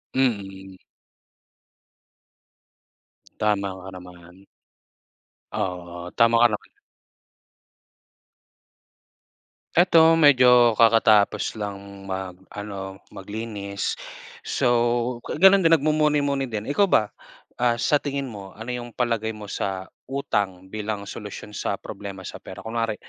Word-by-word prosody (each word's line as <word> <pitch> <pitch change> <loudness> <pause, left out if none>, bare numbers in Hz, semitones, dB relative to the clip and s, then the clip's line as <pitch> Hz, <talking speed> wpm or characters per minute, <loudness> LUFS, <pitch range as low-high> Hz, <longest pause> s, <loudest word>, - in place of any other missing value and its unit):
Mm. 95 -7 -1 2.6
Tama 105 -2 +1
ka 95 - -10
naman. 90 +1 -14 1.1
Oo, 90 -1 -4
tama 115 0 +4
ka - - +8
naman. 105 - -7 3.0
'Eto 165 -2 +6
medyo 125 -6 +6
kakatapos 110 -2 +4
lang 100 -1 -7
mag 95 -1 -5 0.2
ano, 100 -2 -7
maglinis 100 0 -5 0.4
so 120 0 +1
ga - - -6
ganun 195 +4 +7
din 165 0 +7
nagmumuni-muni 150 -2 +1
din. 110 -1 -5
Ikaw 200 +7 +3
ba, 105 - +2 0.5
ah, 120 -1 +3
sa 145 +5 +2
tingin 140 -2 -4
mo 100 -3 -10
ano 115 +3 -6
yung 120 -1 -6
palagay 115 -3 -1
mo 105 - -10
sa 95 -1 -3 0.2
utang 100 -9 -2
bilang 105 -1 -4
solusyon 105 0 -8
sa 105 - -2
problema 100 -1 -8
sa - - -8
pera? - - -10
Kunwari 115 -1 -2
110 Hz, 105 wpm, -24 LUFS, 100-125 Hz, 3.0 s, ka